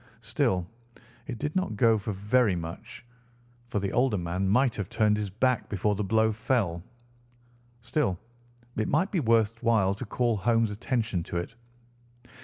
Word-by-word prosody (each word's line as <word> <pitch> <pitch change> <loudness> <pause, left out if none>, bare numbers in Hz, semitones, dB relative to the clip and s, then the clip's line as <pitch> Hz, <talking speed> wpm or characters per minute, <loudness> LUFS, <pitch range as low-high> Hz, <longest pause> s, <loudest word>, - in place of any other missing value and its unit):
Still, 115 - 0 0.6
it 125 -5 -5
did 150 +6 -3
not 185 - 0
go 115 0 +5
for 105 - -4
very 105 +1 +2
much, 85 +7 -7 0.6
for 120 - -3
the 100 -1 -2
older 125 -3 +2
man 90 +2 -1
might 125 +3 +3
have 100 -2 -3
turned 110 -2 +2
his 105 -1 -2
back 125 +5 0
before 105 +1 0
the 105 +1 -2
blow 110 +2 +2
fell. 105 -6 0 1.0
Still, 115 - 0 0.6
it 110 - 0
might 170 +8 +1
be 185 - +1
worth 115 -3 +2
while 105 -4 +3
to 110 +6 -6
call 120 0 0
Holmes' 115 +2 +2
attention 110 -3 -1
to 85 - -4
it. 85 +6 -4
110 Hz, 160 wpm, -28 LUFS, 100-120 Hz, 1.0 s, go